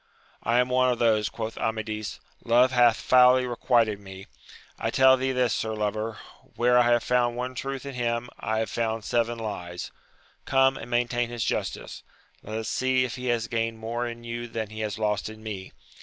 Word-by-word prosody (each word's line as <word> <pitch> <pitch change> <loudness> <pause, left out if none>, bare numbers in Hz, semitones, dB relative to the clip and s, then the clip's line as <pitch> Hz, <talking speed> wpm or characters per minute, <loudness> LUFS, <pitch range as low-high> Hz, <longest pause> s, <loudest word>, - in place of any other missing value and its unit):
I 115 +1 +1
am 125 0 +3
one 130 0 +3
of 120 - -1
those, 110 -3 +2
quoth 110 -1 -5
Amadis: 110 -1 -3 0.2
love 125 +2 +4
hath 120 -3 +5
foully 125 0 +5
requited 115 -3 +1
me; 95 -1 -10 0.5
I - - -1
tell 130 0 +6
thee 130 0 -1
this, 125 -3 +1
sir 110 0 -2
lover, 110 +1 -2 0.4
where 125 +1 +4
I 120 -1 +4
have 120 -1 +3
found 120 -1 +1
one 125 +1 -3
truth 135 +1 -5
in 140 - -6
him, 120 -1 -1
I 110 - -1
have 110 -2 -1
found 115 -1 -1
seven 120 +1 0
Hes. 90 -6 -5 0.5
Come, 135 0 +3
and - - -8
maintain 120 0 0
his 120 -2 -3
justice: - - -3 0.4
let 110 +1 -5
us 110 -1 -4
see 130 +2 +1
if 125 - -5
he 125 0 -5
has 120 -1 0
gained 115 -1 -2
more 120 +2 -3
in 120 0 -7
you 120 0 -5
than 110 -2 -5
he 110 - -8
has 105 -1 -3
lost 105 -1 -1
in 110 0 -11
me 100 -4 -6
120 Hz, 195 wpm, -26 LUFS, 110-125 Hz, 0.5 s, tell